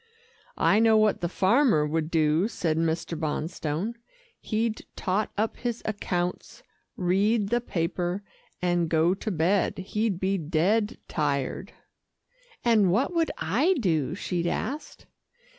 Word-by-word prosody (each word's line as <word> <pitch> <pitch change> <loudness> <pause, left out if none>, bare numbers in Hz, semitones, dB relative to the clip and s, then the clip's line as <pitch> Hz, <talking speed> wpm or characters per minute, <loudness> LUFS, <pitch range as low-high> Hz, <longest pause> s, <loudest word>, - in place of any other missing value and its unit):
"I 210 - +4
know 225 -1 +5
what 215 -1 +2
the 175 - -1
farmer 195 - +3
would 155 +1 -1
do," 160 +3 +2
said 165 -8 -1
Mr. 165 +1 -1
Bonstone, 160 +6 -3 0.4
"he'd 220 0 -2
tot 200 +2 -1
up 215 +2 -1
his 240 -1 -3
accounts, 180 - -3 0.3
read 200 +4 +2
the 240 +2 +1
paper, 175 -1 -2 0.4
and 175 -2 +1
go 165 +2 +3
to 205 +3 -4
bed. 185 +2 +1
He'd 200 0 -1
be 190 +1 0
dead 185 +8 +1
tired." 145 +5 -2 0.9
"And 215 -6 +4
what 255 - +1
would 330 -1 +1
I 270 - +2
do?" 160 - 0
she 175 -3 -2
asked. 295 +3 -4
185 Hz, 125 wpm, -27 LUFS, 165-220 Hz, 0.9 s, know